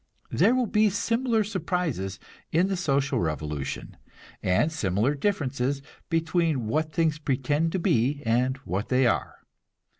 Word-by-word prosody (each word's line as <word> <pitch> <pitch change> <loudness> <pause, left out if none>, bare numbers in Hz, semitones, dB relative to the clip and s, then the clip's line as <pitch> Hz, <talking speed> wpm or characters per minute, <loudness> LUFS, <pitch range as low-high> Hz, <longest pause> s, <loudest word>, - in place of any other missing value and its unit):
There 240 - +4
will 255 -1 +2
be 215 0 +3
similar 230 +3 +1
surprises 170 - -2 0.3
in 175 +4 +3
the 195 - 0
social 140 -6 +1
revolution, 75 -3 -3 0.4
and 95 - +2
similar 110 - +1
differences 140 -5 -1 0.3
between 165 -5 +1
what 155 +8 0
things 155 -1 +1
pretend 145 +3 0
to - - +1
be 145 - +1
and 125 +4 +2
what 95 +4 -2
they 130 0 +3
are. 120 - -1
145 Hz, 130 wpm, -26 LUFS, 120-180 Hz, 0.4 s, There